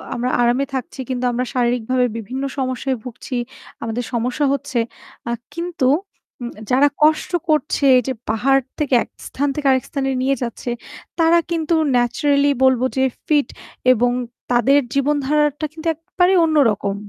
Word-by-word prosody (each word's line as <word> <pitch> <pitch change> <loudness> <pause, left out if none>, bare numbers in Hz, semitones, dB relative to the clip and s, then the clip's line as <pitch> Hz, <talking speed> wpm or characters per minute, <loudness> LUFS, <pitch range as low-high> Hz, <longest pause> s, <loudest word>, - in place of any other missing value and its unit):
আমরা 245 +1 -1
আরামে 245 +3 +2
থাকছি 265 +1 -5
কিন্তু 250 -1 -2
আমরা 250 +1 -1
শারীরিকভাবে 250 0 +1
বিভিন্ন 250 +5 -5
সমস্যায় 260 0 -1
ভুগছি। 250 +1 -7 0.5
আমাদের 230 +2 -3
সমস্যা 250 +5 0
হচ্ছে। 255 -3 -2 0.5
আ - - 0 0.2
কিন্তু 335 -6 -1 0.5
উম 240 - -4 0.2
যারা 275 +3 +5 0.2
কষ্ট 310 +3 +3 0.2
করছে 300 -1 +1
এই - - +4
যে 265 - 0 0.2
পাহাড় 270 +5 +3 0.2
থেকে 285 -3 -1
এক - - -18 0.2
স্থান 285 +2 -1
থেকে 295 -2 -1
আরেক 260 -1 +2
স্থানে 270 -1 -2
নিয়ে 270 +1 +2
যাচ্ছে 235 +1 -5 0.5
তারা 330 +1 +5
কিন্তু 330 0 0 0.2
ন্যাচারালি 280 +4 +2
বলব 260 -2 +4 0.2
যে 265 - +3 0.2
ফিট 295 -5 +3 0.5
এবং 245 +1 +2 0.4
তাদের 245 +4 +4 0.2
জীবনধারাটা 295 +1 +1
কিন্তু 320 +1 -6
একেবারেই 360 +4 +1
অন্য 315 -1 +1
রকম। 200 -1 -2
265 Hz, 150 wpm, -20 LUFS, 245-295 Hz, 0.5 s, যারা